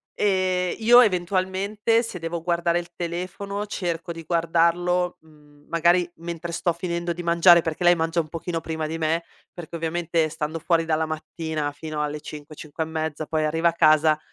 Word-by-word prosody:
ehm, 185 -2 +1
io 240 +2 +7
eventualmente 195 +3 +1
se 225 -6 -6
devo 165 0 -4
guardare 170 0 +1
il 170 0 -8
telefono, 185 +4 -4
cerco 170 -3 -3
di 165 0 -7
guardarlo, 170 +2 +1
mhmm, 150 -2 -22
magari 175 +1 +3
mentre 170 0 -6
sto 175 0 0
finendo 170 0 -3
di 175 - -6
mangiare 170 0 +6
perché 160 +2 -3
lei 175 0 +7
mangia 165 +1 0
un 155 - -9
pochino 165 0 -4
prima 160 -1 -4
di 160 - -4
me, 165 +1 0 0.3
perché 170 -2 -8
ovviamente 165 0 0
stando 155 0 -4
fuori 165 0 +1
dalla 160 0 0
mattina 155 -1 -4
fino 150 +1 -5
alle 150 0 -3
5-5 150 +1 -7
e - - -10
mezza, 160 -1 -3
poi 155 -1 0
arriva 165 +2 +1
a 165 - -4
casa, 155 -1 +4
170 Hz, 170 wpm, -24 LUFS, 160-175 Hz, 0.3 s, io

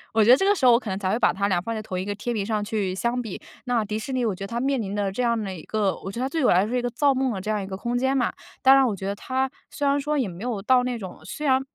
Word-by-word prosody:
我 220 - +5
觉 235 - +6
得 260 - +8
这 385 - +1
个 410 +1 +4
时 275 - 0
候 245 - +8
我 235 - +5
可 235 - -7
能 190 - -2
才 190 -1 -1
会 230 - 0
把 - - +3
它 200 +1 0
俩 175 -2 +2
放 230 +5 -4
在 215 - -3
同 185 -3 -4
一 185 - -3
个 205 - -3
天 235 +4 -3
平 205 -3 -1
上 215 -1 -1
去 205 -3 -2
相 240 +4 -1
比。 220 -5 -6 0.3
那 245 -3 +1
迪 210 +1 -3
士 265 +5 -5
尼 255 -1 0
我 215 - +1
觉 195 - -7
得 - - -7
它 235 +2 -3
面 270 -2 +1
临 200 0 -4
的 200 -2 0
这 250 - -3
样 235 -1 +2
的 195 -3 -4
一 170 - -8
个 210 -3 0
我 195 - -7
觉 235 +5 -5
得 - - +1
它 - - -2
对 315 0 -1
我 - - +5
来 180 - +5
说 215 - -5
是 250 - +1
一 - - -2
个 245 - -1
造 275 +4 +2
梦 260 -2 0
的 190 - -4
这 215 +3 -2
样 210 -2 0
一 190 - -6
个 190 - -5
空 240 +5 -2
间 265 +2 +1
嘛。 245 - +1 0.3
当 265 +1 +7
然 270 -2 +5
我 210 - -1
觉 190 - -7
得 200 - -1
它 260 +5 -2 0.2
虽 285 - -3
然 280 +1 +3
说 300 +1 -1
也 245 -7 0
没 175 +1 -10
有 220 -5 -2
到 250 +3 +4
那 250 -1 -2
种 190 -4 -8
虽 300 - -5
然 265 -1 +4
230 Hz, 410 characters per minute, -24 LUFS, 200-255 Hz, 0.3 s, 得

